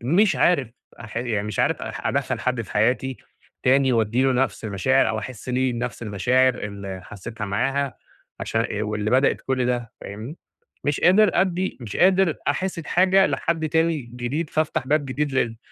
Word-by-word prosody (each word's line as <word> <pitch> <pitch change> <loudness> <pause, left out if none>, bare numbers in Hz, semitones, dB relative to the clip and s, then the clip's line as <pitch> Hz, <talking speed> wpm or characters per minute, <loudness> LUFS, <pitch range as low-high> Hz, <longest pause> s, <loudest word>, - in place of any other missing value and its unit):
م 125 +7 -1
مش 205 0 +4
عارف 145 -9 +3 0.3
أح 115 -1 -10
يعني 115 -4 -1
مش 105 -3 -5
عارف - - +1
أح - - -5
أدخَّل - - -1
حد 125 -1 -1
في - - -11
حياتي 125 +5 +1 0.5
تاني، 130 0 +4
وادي 115 +2 +2
له 135 0 +3
نفس 125 -4 -1
المشاعر 110 +6 +2
أو 110 - -1
أحس 125 +1 -8
ليه 130 0 +1
نفس 120 0 -4
المشاعر 120 +5 +2
اللي 100 -4 -6
حسيتها 110 +3 -7
معاها، 135 +7 -1 0.4
عشان 115 - -1
إ 105 0 -2
واللي 105 0 -2
بدأت 130 +2 +3
كل 130 -2 -1
ده. 120 -2 -2
فاهمني، 110 - -8 0.5
مش 145 0 0
قادر 195 +3 +5
أدّي، 190 0 0
مش 110 -4 -6
قادر 185 -2 +4
أحس 185 -1 -1
بحاجة 190 +4 +3
لحد 160 -2 -1
تاني 165 0 +2
جديد، 125 +6 -4
فافتح 155 -4 -1
باب 150 +1 +2
جديد 145 +2 -2
لل 115 -4 0
130 Hz, 175 wpm, -23 LUFS, 110-150 Hz, 0.5 s, قادر